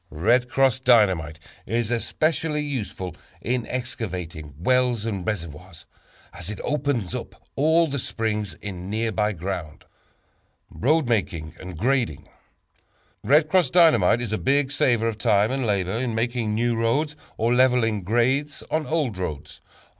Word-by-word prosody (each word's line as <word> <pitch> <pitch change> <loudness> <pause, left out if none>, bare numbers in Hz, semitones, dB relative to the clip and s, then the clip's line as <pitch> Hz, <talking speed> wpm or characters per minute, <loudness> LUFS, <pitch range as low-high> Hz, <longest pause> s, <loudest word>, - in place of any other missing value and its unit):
"Red 120 +11 +2
Cross" 135 -1 +2
Dynamite 95 - +3 0.3
is 115 0 -1
especially 150 +5 0
useful 105 - -4 0.2
in 120 0 -2
excavating 90 - -5
wells 125 +4 +1
and 100 -5 -3
reservoirs, 85 -3 -6 0.5
as 85 +2 -8
it 105 - -6
opens 140 - -1
up - - -6 0.2
all 160 +4 +4
the 140 -1 -3
springs 105 -3 -3
in 95 -2 -7
nearby 110 0 0
ground. 85 -4 -5 0.9
Road 155 +2 +1
Making 95 -9 -1
and 90 -3 -8
Grading. 115 - 0 1.0
"Red 150 +3 +4
Cross" 180 +2 +3
Dynamite 140 - +5
is 115 -3 -3
a 110 - -1
big 140 0 +1
saver 120 -5 +2
of 110 -1 -3
time 105 +1 +3
and 135 -3 -1
labor 95 -3 0
in 120 -2 -2
making 115 -2 -1
new 120 +1 +1
roads, 140 +7 0 0.2
or 115 +2 +2
leveling 125 -4 +3
grades 125 +9 0
on 155 -1 0
old 145 - -1
roads. 75 -5 -6
115 Hz, 140 wpm, -24 LUFS, 95-130 Hz, 1.0 s, Dynamite